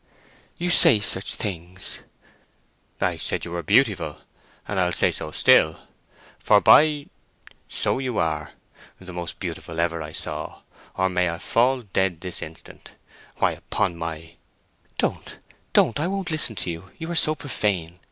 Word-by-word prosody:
"You 175 Hz, +1 st, -1 dB
say 110 Hz, -, +8 dB
such 100 Hz, -1 st, +1 dB
things." 90 Hz, -2 st, -5 dB, 1.0 s
"I -, -, 0 dB
said -, -, -3 dB
you 85 Hz, -, -8 dB
were 85 Hz, 0 st, -3 dB
beautiful, 80 Hz, -, +2 dB, 0.5 s
and 105 Hz, -, -2 dB
I'll 90 Hz, -1 st, +2 dB
say -, -, +2 dB
so -, -, -5 dB
still; 80 Hz, 0 st, +4 dB, 0.6 s
for, -, -, +4 dB
by -, -, +8 dB
G—— 145 Hz, -2 st, -5 dB, 0.6 s
so -, -, -1 dB
you 130 Hz, -4 st, -3 dB
are! 80 Hz, -2 st, -1 dB, 0.5 s
The 90 Hz, -1 st, -10 dB
most 85 Hz, -1 st, -6 dB
beautiful 85 Hz, 0 st, -6 dB
ever 85 Hz, -1 st, 0 dB
I 75 Hz, 0 st, -7 dB
saw, -, -, -6 dB, 0.3 s
or 95 Hz, -, +1 dB
may 90 Hz, -1 st, 0 dB
I 85 Hz, -, -4 dB
fall 125 Hz, +7 st, +1 dB
dead 95 Hz, -4 st, -1 dB
this 90 Hz, -2 st, -5 dB
instant! 80 Hz, +1 st, -11 dB, 0.4 s
Why, -, -, +2 dB
upon 95 Hz, -5 st, -2 dB
my 80 Hz, 0 st, -7 dB, 0.3 s
——" -, -, -39 dB
"Don't—don't! 120 Hz, -, -1 dB
I 155 Hz, -, 0 dB
won't 195 Hz, -2 st, -3 dB
listen 150 Hz, -8 st, +4 dB
to 90 Hz, -, -3 dB
you—you 95 Hz, -, -8 dB
are -, -, -2 dB
so 155 Hz, -2 st, +3 dB
profane!" 95 Hz, -, -2 dB
95 Hz, 150 wpm, -23 LUFS, 85-120 Hz, 1.0 s, say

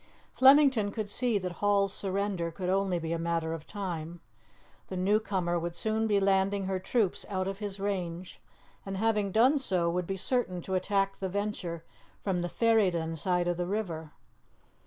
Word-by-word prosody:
Flemington 265 Hz, -5 st, +6 dB
could 210 Hz, -1 st, -4 dB
see 245 Hz, -4 st, +1 dB
that 185 Hz, -2 st, -3 dB
Hall's 200 Hz, -1 st, +2 dB
surrender 195 Hz, -3 st, -1 dB
could 180 Hz, +2 st, -4 dB
only 190 Hz, -1 st, +1 dB
be 165 Hz, 0 st, -3 dB
a 165 Hz, -, -2 dB
matter 165 Hz, -1 st, -1 dB
of 160 Hz, -1 st, -7 dB
time; 175 Hz, -5 st, -5 dB, 0.7 s
the 185 Hz, -, -5 dB
new 200 Hz, +4 st, +3 dB
comer 180 Hz, -5 st, -1 dB
would 170 Hz, 0 st, -4 dB
soon 220 Hz, +4 st, 0 dB
be 205 Hz, -2 st, +3 dB
landing 195 Hz, 0 st, +2 dB
her 190 Hz, 0 st, -1 dB
troops 205 Hz, 0 st, 0 dB
out 185 Hz, -2 st, -1 dB
of 195 Hz, 0 st, -4 dB
his 205 Hz, -2 st, -5 dB
range, 185 Hz, -3 st, -4 dB, 0.4 s
and, 195 Hz, -1 st, -5 dB
having 210 Hz, -2 st, +1 dB
done 255 Hz, +8 st, +4 dB
so, 180 Hz, -9 st, +1 dB
would 180 Hz, 0 st, -2 dB
be 195 Hz, -, -3 dB
certain 200 Hz, -3 st, 0 dB
to 190 Hz, -, -4 dB
attack 195 Hz, +1 st, 0 dB
the 190 Hz, -, -3 dB
Venture 190 Hz, -4 st, -3 dB, 0.4 s
from 190 Hz, -3 st, -1 dB
the 175 Hz, 0 st, -2 dB
Ferryden 185 Hz, -9 st, +2 dB
side 175 Hz, +2 st, 0 dB
of 175 Hz, -1 st, 0 dB
the 175 Hz, 0 st, -2 dB
river. 175 Hz, -7 st, -3 dB
195 Hz, 180 wpm, -29 LUFS, 175-205 Hz, 0.7 s, Flemington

